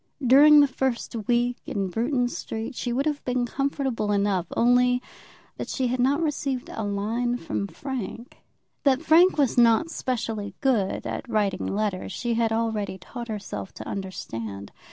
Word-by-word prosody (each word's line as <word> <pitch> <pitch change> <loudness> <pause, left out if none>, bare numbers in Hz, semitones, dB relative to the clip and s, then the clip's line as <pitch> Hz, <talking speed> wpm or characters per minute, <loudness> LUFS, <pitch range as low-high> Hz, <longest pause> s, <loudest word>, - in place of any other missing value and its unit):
During 290 +4 +8
the 285 - +5
first 260 -3 -2
week 240 0 +2
in 195 -2 -2
Bruton 245 - 0
Street 225 +1 -5
she 245 0 -3
would 265 +4 0
have 300 -2 -1
been 250 -1 0
comfortable 265 -4 -1
enough, 200 -3 +1
only 245 +1 +4 0.6
that - - -5
she 255 -3 0
had 250 +1 -1
not 280 +6 +2
received 280 -4 -2
a - - -4
line 220 +4 -1
from 105 - -3
Frank. 250 - -6 0.4
That 275 +1 +3
Frank 330 +4 +5
was 270 -4 +2
not 235 +8 +4
specially 225 -7 -3
good 235 -9 +1
at - - -5
writing 210 -4 0
letters 200 -2 -2
she 235 +5 -2
had 225 -1 +1
already 220 -4 -1
taught 235 +6 -8
herself 195 - -6
to - - -8
understand. 115 - -6
240 Hz, 155 wpm, -25 LUFS, 205-265 Hz, 0.6 s, During